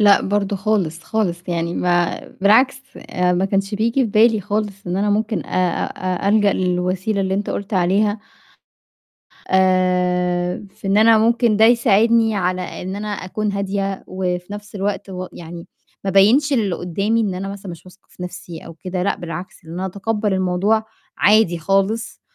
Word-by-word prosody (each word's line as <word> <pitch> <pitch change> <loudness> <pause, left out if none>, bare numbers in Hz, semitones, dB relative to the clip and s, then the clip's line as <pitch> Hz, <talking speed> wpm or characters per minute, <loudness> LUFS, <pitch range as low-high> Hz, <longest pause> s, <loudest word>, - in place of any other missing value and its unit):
لأ، 205 -1 +6
برضه 200 0 -1
خالص، 190 -5 -1
خالص، 180 -6 -2
يعني 170 0 -2
ما 175 -1 +1 0.2
بالعكس، 255 +7 +4
آآ 180 0 -1
ما 180 +2 +1
كانش 195 +1 -1
بييجي 230 +5 +1
في 220 - -3
بالي 220 0 +4
خالص 205 0 -3
إن 175 +1 -2
أنا 205 +1 +1
ممكن 215 -2 -1
آآ 180 -2 0
أ 185 +1 -3
ألجأ 205 -1 +4
للوسيلة 185 +3 -1
اللي 190 0 0
أنت 200 +1 -2
قُلت 200 +1 -4
عليها، 200 +4 +2 1.3
آآ 180 -1 +1
في 195 - -9
إن 195 +1 +3
أنا 220 +1 +6
ممكن 230 0 +2
ده 220 - +6
يساعدني 230 -1 +4
على 185 -1 0 0.2
إن 185 +1 -5
أنا 210 +1 -5
أكون 205 +1 -3
هادية 195 -1 -2
وفي 180 0 -3
نَفْس 205 0 -9
الوقت 200 0 -3
و 185 -1 -5
يعني 170 0 -9 0.4
ما 195 - -1
أبيّنش 230 +10 +4
للقُدّامي 200 0 0
إن 205 -4 -1
أنا 195 +2 -4
مثلًا 195 -2 -7
مش 170 0 -12
واثقة 185 +2 -18
في 180 - -10
نَفْسي 180 -2 -8
أو 165 - -9
كده 180 +2 -4
لأ 200 - 0
بالعكس، 175 +1 -8
إن 160 - -10
أنا 185 +2 -3
أتقبّل 205 +2 -2
الموضوع 190 +4 +1 0.3
عادي 210 -5 +4
خالص 195 +6 -1
195 Hz, 165 wpm, -20 LUFS, 180-215 Hz, 1.3 s, لأ